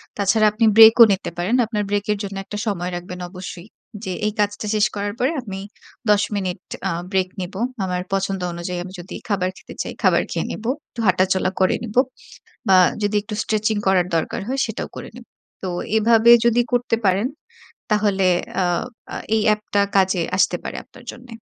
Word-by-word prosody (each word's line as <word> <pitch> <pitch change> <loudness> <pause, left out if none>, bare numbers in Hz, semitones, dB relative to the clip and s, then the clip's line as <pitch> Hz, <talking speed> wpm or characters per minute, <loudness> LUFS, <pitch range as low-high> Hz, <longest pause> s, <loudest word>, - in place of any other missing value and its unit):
তা 205 - -3
ছাড়া 220 -1 +3
আপনি 220 +2 +1
ব্রেকও 225 +1 +10
নিতে 190 -2 -2
পারেন। 190 +8 0
আপনার 210 -2 -2
break 205 0 0
এর 210 - 0
জন্য 200 0 -5
একটা 210 - -6
সময় 180 -4 -2
রাখবেন 180 +1 -7
অবশ্যই। 185 0 -8 0.4
যে, 185 - -3
এই 210 - 0
কাজটা 205 +1 0
শেষ 210 - +4
করার 205 0 -2
পরে 260 +5 +2
আমি 195 -5 -7 0.5
১০ 205 -1 +5
মিনিট 185 -2 -2 0.3
আ - - -1 0.2
break 185 -1 +1
নেব। 180 +1 -6 0.3
আমার 180 -1 -2
পছন্দ 195 -1 -1
অনুযায়ী 175 +1 -4
আমি 185 +1 -10
যদি 175 - -8
খাবার 185 -3 +1
খেতে - - -12
চাই, - - -5
খাবার - - +4
খেয়ে - - -2
নেব। - - -7 0.3
একটু 235 - -12
হাঁটাচলা 185 +1 +2
করে 185 - +3
নেব। 220 -1 -7 0.7
বা 190 - +7 0.3
যদি 205 +1 +1
একটু 210 0 -7
স্ট্রেচিং 215 0 0
করার 185 -2 +3
দরকার 160 - -2
হয় 270 +1 -2
সেটাও 220 - -5
করে - - -7
নেব। 245 - -11 0.4
তো 185 - -3 0.3
এভাবে 225 +1 +5
যদি 235 0 +4
করতে 245 -1 +1
পারেন, 195 +3 +2 0.6
তাহলে 205 -3 +2 0.4
আ - - +2 0.5
আ - - -4 0.2
এই 220 - +2
app 210 - -14
টা 200 - +5
কাজে 190 -2 +3
আসতে - - +3
পারে - - -5
আপনার - - -17
জন্যে। 245 -1 -14
205 Hz, 185 wpm, -21 LUFS, 185-220 Hz, 0.7 s, ব্রেকও